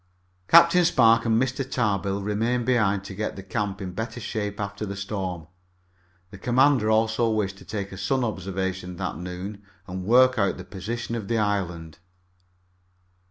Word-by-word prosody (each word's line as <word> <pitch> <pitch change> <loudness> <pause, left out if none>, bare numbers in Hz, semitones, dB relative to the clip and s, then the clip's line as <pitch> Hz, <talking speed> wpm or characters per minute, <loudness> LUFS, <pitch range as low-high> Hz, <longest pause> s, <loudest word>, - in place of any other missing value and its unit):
Captain 170 +1 +7
Spark 115 -8 +4
and 115 -1 +3
Mr. 130 +1 0
Tarbill 100 -6 -1
remained 115 +4 0
behind 105 -6 +2
to 100 - -8
get 110 +3 -3
the 95 - -8
camp 100 0 -3
in 90 - -5
better 115 +5 -5
shape 105 -3 -4
after 100 0 -4
the 100 -1 -4
storm. 95 -4 -4 0.9
The 100 - -11
commander 125 0 +3
also 110 +1 +2
wished 100 -3 -1
to - - -14
take 100 -2 -5
a 95 - -8
sun 130 +6 0
observation 95 -3 -3
that 90 -1 -4
noon 90 +3 -6 0.2
and 95 -1 -6
work 130 +4 +5
out 100 -2 +1
the 90 - -9
position 115 +6 -5
of 110 -4 -4
the 115 - 0
island. 90 -7 -2
105 Hz, 160 wpm, -25 LUFS, 95-115 Hz, 0.9 s, Captain